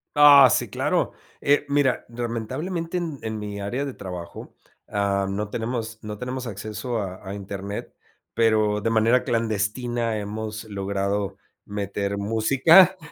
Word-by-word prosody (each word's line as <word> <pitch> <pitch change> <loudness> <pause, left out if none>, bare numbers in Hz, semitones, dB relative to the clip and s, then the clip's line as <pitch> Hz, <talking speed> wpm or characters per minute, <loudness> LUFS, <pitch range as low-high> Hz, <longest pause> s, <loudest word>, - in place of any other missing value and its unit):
Ah, 145 -3 +9
sí, - - +1
claro, - - 0 0.3
eh, 145 +1 +2
mira, 140 -3 +2
lamentablemente 130 - -3
en 165 -6 -4
en 110 -1 -4
mi 105 -1 -5
área 125 +8 -2
de 135 - -5
trabajo, 90 -3 -8 0.4
ah, 100 -1 0
no 105 +1 -3
tenemos 115 -1 -4
no 105 -1 -6
tenemos 125 +1 -4
acceso 110 +3 -4
a 95 -2 -5
a 95 - -5
Internet, 100 0 -6 0.4
pero 110 -2 +2
de 115 - 0
manera 115 +3 +3
clandestina 115 0 -1
hemos 110 +1 -5
logrado 100 0 -2 0.3
meter 100 0 -3
música, 135 - +5
110 Hz, 135 wpm, -24 LUFS, 100-125 Hz, 0.4 s, Ah